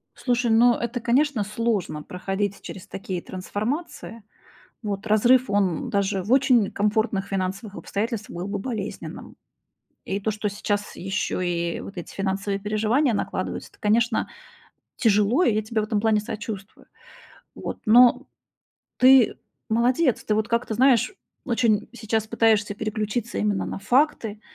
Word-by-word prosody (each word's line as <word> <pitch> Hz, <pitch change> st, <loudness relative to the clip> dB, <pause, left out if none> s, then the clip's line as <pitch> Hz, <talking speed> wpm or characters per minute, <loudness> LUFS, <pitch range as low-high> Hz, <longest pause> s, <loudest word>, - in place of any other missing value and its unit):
Слушай, 245 Hz, -2 st, 0 dB
ну 240 Hz, +2 st, +6 dB
это, 235 Hz, +1 st, -3 dB
конечно, 245 Hz, 0 st, +2 dB
сложно 210 Hz, -7 st, -2 dB
проходить 195 Hz, +2 st, -3 dB
через 190 Hz, -, -9 dB
такие 185 Hz, -2 st, -5 dB
трансформации. 225 Hz, -, -5 dB, 0.6 s
Вот, 205 Hz, 0 st, -4 dB
разрыв, 240 Hz, +3 st, +4 dB
он 195 Hz, -5 st, 0 dB
даже 200 Hz, -1 st, 0 dB
в 210 Hz, +7 st, -2 dB
очень 255 Hz, -6 st, +4 dB
комфортных 210 Hz, -1 st, 0 dB
финансовых 195 Hz, +2 st, -3 dB
обстоятельствах 215 Hz, -1 st, -4 dB
был 200 Hz, -, -5 dB
бы 200 Hz, 0 st, -3 dB
болезненным. 215 Hz, -2 st, -6 dB, 0.7 s
И 195 Hz, -, -2 dB
то, 215 Hz, +2 st, -1 dB
что 210 Hz, 0 st, -2 dB
сейчас 205 Hz, 0 st, -3 dB
ещё 190 Hz, 0 st, -2 dB
и 170 Hz, -1 st, -1 dB
вот 195 Hz, -, -9 dB
эти 175 Hz, -, -7 dB
финансовые 195 Hz, +1 st, -2 dB
переживания 220 Hz, +6 st, +1 dB
накладываются, -, -, -3 dB
это, -, -, -25 dB
конечно, 225 Hz, +2 st, +1 dB, 0.7 s
тяжело, 220 Hz, -, +3 dB
и 235 Hz, -, +3 dB
я 215 Hz, -, +1 dB
тебе 215 Hz, 0 st, -2 dB
в -, -, -2 dB
этом 215 Hz, -1 st, 0 dB
плане 220 Hz, -1 st, +2 dB
сочувствую. 205 Hz, -2 st, -7 dB, 0.7 s
Вот, -, -, -6 dB
но 240 Hz, +2 st, +6 dB, 0.7 s
ты 255 Hz, -2 st, +6 dB, 0.3 s
молодец, 245 Hz, +4 st, +2 dB
ты 215 Hz, -, +1 dB
вот 215 Hz, 0 st, 0 dB
как-то, 235 Hz, -1 st, -1 dB
знаешь, 260 Hz, -, +4 dB, 0.3 s
очень 230 Hz, -4 st, +1 dB
сейчас 220 Hz, -2 st, -2 dB
пытаешься 215 Hz, -2 st, +2 dB
переключиться 215 Hz, +2 st, -3 dB
именно 205 Hz, -2 st, 0 dB
на -, -, -5 dB
факты, 225 Hz, -2 st, +1 dB
215 Hz, 140 wpm, -24 LUFS, 200-235 Hz, 0.7 s, ну